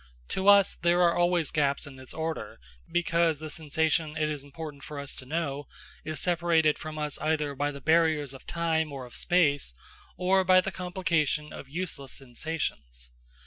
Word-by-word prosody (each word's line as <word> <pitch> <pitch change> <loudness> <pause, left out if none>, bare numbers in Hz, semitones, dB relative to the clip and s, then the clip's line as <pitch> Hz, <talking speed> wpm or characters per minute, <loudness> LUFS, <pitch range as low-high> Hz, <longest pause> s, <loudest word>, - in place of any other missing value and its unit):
To 190 +1 -1
us 200 -1 +7
there 175 +1 +2
are 170 -1 +4
always 175 -2 +2
gaps 140 -3 +1
in 140 -2 -10
this 130 -1 -11
order, 160 - -4 0.3
because 170 -2 +2
the 155 +1 -6
sensation 155 0 0
it 155 0 +1
is 145 -2 -4
important 145 0 -8
for 150 - -7
us 140 -1 -5
to 130 - -7
know 145 -2 -2 0.4
is 155 0 -2
separated 170 -3 +2
from 155 -1 -6
us 150 -1 -3
either 150 -2 0
by 145 +1 -1
the 140 -1 -7
barriers 155 -3 +3
of 135 - -13
time 160 -2 0
or 135 -2 -6
of 120 - -14
space, 145 - +2 0.4
or 190 +2 +3
by 185 0 +6
the 195 +1 -1
complication 170 -5 -1
of 135 - -9
useless 150 -4 -4
sensations. 120 - -5
155 Hz, 175 wpm, -28 LUFS, 145-170 Hz, 0.4 s, us